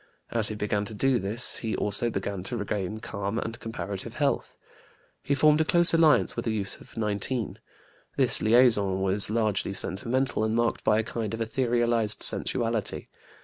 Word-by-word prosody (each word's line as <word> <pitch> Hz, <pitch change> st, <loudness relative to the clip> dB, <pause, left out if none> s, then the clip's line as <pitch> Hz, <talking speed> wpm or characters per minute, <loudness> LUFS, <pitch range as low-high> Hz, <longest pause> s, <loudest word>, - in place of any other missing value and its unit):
As 115 Hz, -2 st, +1 dB
he 110 Hz, -, -4 dB
began 105 Hz, 0 st, -1 dB
to 110 Hz, -, -8 dB
do 130 Hz, +3 st, +2 dB
this, 105 Hz, +6 st, 0 dB
he 110 Hz, -2 st, -3 dB
also 105 Hz, +3 st, 0 dB
began 100 Hz, -2 st, -4 dB
to 120 Hz, +2 st, -4 dB
regain 105 Hz, 0 st, -4 dB
calm 100 Hz, +1 st, -4 dB
and 115 Hz, 0 st, -4 dB
comparative 100 Hz, -3 st, -4 dB
health. -, -, -1 dB, 0.6 s
He 140 Hz, -, -1 dB
formed 150 Hz, +2 st, +4 dB
a -, -, +4 dB
close 170 Hz, +2 st, +4 dB
alliance 165 Hz, -2 st, +4 dB
with -, -, -4 dB
a -, -, +1 dB
youth 100 Hz, -3 st, -3 dB
of -, -, -17 dB
19. 105 Hz, +2 st, -2 dB, 0.6 s
This -, -, +4 dB
liaison 110 Hz, -5 st, +4 dB
was 95 Hz, +1 st, +3 dB
largely 105 Hz, -3 st, 0 dB
sentimental, 120 Hz, +6 st, -1 dB
and 110 Hz, 0 st, 0 dB
marked 120 Hz, 0 st, 0 dB
by 105 Hz, -, +3 dB
a 110 Hz, -, +1 dB
kind 115 Hz, -1 st, -4 dB
of -, -, -9 dB
etherealized 115 Hz, -2 st, 0 dB
sensuality. 115 Hz, -3 st, 0 dB
110 Hz, 170 wpm, -26 LUFS, 105-120 Hz, 0.6 s, formed